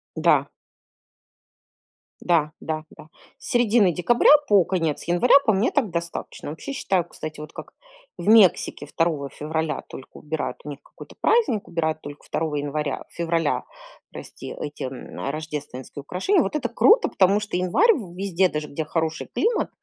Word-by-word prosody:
Да. - - +3 1.7
Да. 160 -4 +2
Да. 155 -1 -4
Да. - - -13 0.3
С - - -7
середины 230 -5 +4
декабря 205 - +4 0.2
по 200 -3 +5
конец 165 -5 -1
января 175 +10 +4
по 220 - +4
мне 200 +5 +1
так 270 -8 +1
достаточно. 170 -3 -5
Вообще, 160 - -7
считаю, 190 -9 0
кстати, 155 -2 -8
вот 150 0 -9
как - - -10 0.4
в - - -7
Мексике 215 -4 +4
2 155 -4 -1
февраля 160 +1 -3
только 135 - -11
убирают 155 +1 -4
у - - -7
них 145 -1 -7
какой-то - - -14
праздник, 435 - +2
убирают 160 -2 -1
только 145 0 -10
2 155 -1 -2
января, 145 0 -3
февраля 165 -2 -1 0.5
прости, - - -9
эти, 145 0 -6
м, 130 0 -7
рождественские 150 -3 -6
украшения. 195 - +1
Вот - - -2
это 300 - -1
круто, 460 +3 +4
потому 195 +2 +3
что 210 -4 -3
январь 290 - +4
в 185 - -8
везде, 190 -1 +1
даже 150 -1 -4
где 155 +2 -4
хороший 160 0 -2
климат, 465 0 +1
170 Hz, 155 wpm, -23 LUFS, 150-200 Hz, 1.7 s, по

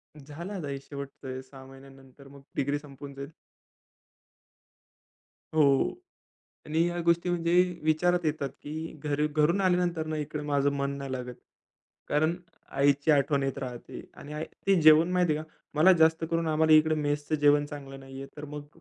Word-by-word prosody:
झालं 150 +7 -8
आता 170 -7 -5
हे 140 -1 -4
शेवटचं 140 -1 -9
आहे. 130 - -5
6 130 0 -14
महिन्यानंतर 135 0 -15
मग 140 0 -14
डिग्री 145 +1 0
संपून 140 -1 -11
जाईल. 140 +1 -7 2.3
हो. 145 - +3 0.7
आणि 155 +1 -2
ह्या 175 0 -2
गोष्टी 170 +1 +2
म्हणजे 170 -1 0 0.3
विचारात 175 +3 +2
येतात 150 -3 -1
की 145 - -7 0.3
घरी 150 +1 +1
घरून 155 +5 +2
आल्यानंतर 175 -3 +1
ना 155 - -3
इकडे 150 0 -4
माझं 145 -1 +1
मन 140 0 -2
नाही 140 -1 -6
लागत. 125 -1 -5 0.7
कारण 155 +3 +2 0.5
आईची 145 +2 +3
आठवण 140 -1 +3
येत 135 0 -2
राहते. 125 -3 -7
आणि 145 - -10
आई 150 +1 -3 0.2
ते 195 -3 +4
जेवण 155 +2 +7
माहिती 175 -4 +2
आहे 155 - -4
का? 155 - -26 0.3
मला 160 +5 +6
जास्त 160 -1 +3
करून 165 0 0
आम्हाला 155 0 +3
इकडे 155 0 +6
मेसचं 145 0 -1
जेवण 145 0 +4
चांगलं 140 -2 -9
नाहीये. 135 0 -9
तर 150 - -7
मग 150 0 -8
150 Hz, 165 wpm, -28 LUFS, 140-160 Hz, 2.3 s, जेवण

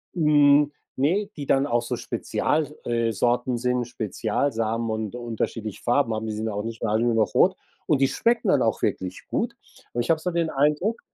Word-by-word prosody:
Hm. 145 -2 +5 0.2
Ne, 185 +10 +1
die 145 - -5
dann 135 +1 +3
auch 120 -4 +1
so 120 - -3
Spezial 150 0 -1
äh, 115 -1 0
Sorten 120 +3 +1
sind, 125 0 0
Spezialsamen 115 +1 -1
und 110 0 -3
unterschiedliche 115 -3 -4
Farben 120 -1 +2
haben. 110 0 -3
Die 110 - -3
sind 110 +1 -3
ja 110 - -3
auch 105 +1 -3
nicht 115 0 -6
mehr 110 - 0
alle 110 +2 +2
nur 120 -1 +2
noch 110 -1 +1
rot. 190 +1 +4 0.3
Und 145 -3 +2
die 135 - +4
schmecken 230 -3 +1
dann 145 -8 +4
auch 110 -3 +1
wirklich 95 0 -2
gut. - - -1 0.4
Und 120 - 0
ich 120 - -5
habe 165 -1 +3
so 180 - -2
den 170 -1 0
Eindruck, 150 +11 +1
120 Hz, 205 wpm, -25 LUFS, 115-150 Hz, 0.4 s, Hm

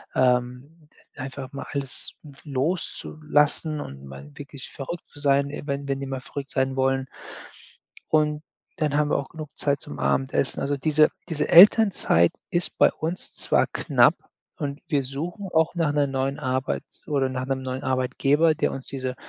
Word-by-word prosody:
ähm, 125 +5 0 0.3
einfach 135 -1 -6
mal 140 - -6
alles 140 -2 -3 0.3
loszulassen 150 0 0
und 70 0 -9
mal 70 +1 -10
wirklich 140 -2 -9
verrückt 150 +5 -6
zu 145 - -15
sein, 140 0 +3
e 150 - -6
wenn 140 -1 -3
wenn 135 0 -1
die 135 - -3
mal 135 -1 -3
verrückt 140 +1 -7
sein 130 0 0
wollen. 135 0 +1 1.0
Und 150 -1 +2 0.4
dann 150 -2 +1
haben 150 0 +2
wir - - +2
auch 140 - -4
genug 155 -3 -8
Zeit 140 -1 0
zum 75 - -7
Abendessen. 130 - +1
Also, 140 +1 0
diese 155 +2 +4 0.2
diese 150 -2 -1
Elternzeit 180 - +7 0.2
ist 175 -1 -1
bei - - +6
uns 165 +3 -4
zwar - - +2
knapp - - +4 0.5
und 145 -1 -4
wir 145 -4 +1
suchen 170 +9 -5
auch 160 0 +3
nach 165 -4 +1
'ner 145 -1 +2
neuen 135 0 -1
Arbeits 130 +1 -3
oder 140 -3 +1
nach 130 0 -3
'nem 135 -1 -1
neuen 130 0 -4
Arbeitgeber, 135 +5 +2
der - - 0
uns 135 - -6
diese 130 -2 -3
140 Hz, 165 wpm, -25 LUFS, 130-150 Hz, 1.0 s, Elternzeit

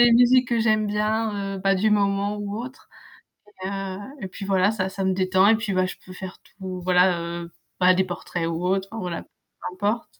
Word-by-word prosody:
les 240 0 +7
musiques 250 +2 +5
que 235 -1 +1
j'aime 215 -1 +2
bien, 210 -1 -1
heu, - - -5
bah 195 +1 +2
du 200 +3 +2
moment 200 0 +1
ou 205 0 -4
autre. 255 +3 -9 0.8
Et 190 - -2
heu, 195 -1 -4 0.2
et 190 - -3
puis 195 +1 -8
voilà 190 0 +3
ça 190 -4 -1
ça 195 0 -4
me 190 - +2
détend 185 +1 +3
et 225 - +6
puis 215 -3 -2
bah, 185 0 +2
je - - -6
peux 185 - -10
faire 185 0 -8
tout 190 -2 -8
voilà 180 0 +4
heu, 170 0 -5 0.3
bah 185 0 +6
des 190 - +3
portraits 175 -2 -4
ou 165 +1 -3
autre 190 +1 +1
enfin 225 0 -5
voilà, 175 -2 -4
peu - - -30 0.4
importe. 205 +5 -1
195 Hz, 225 wpm, -24 LUFS, 185-215 Hz, 0.8 s, les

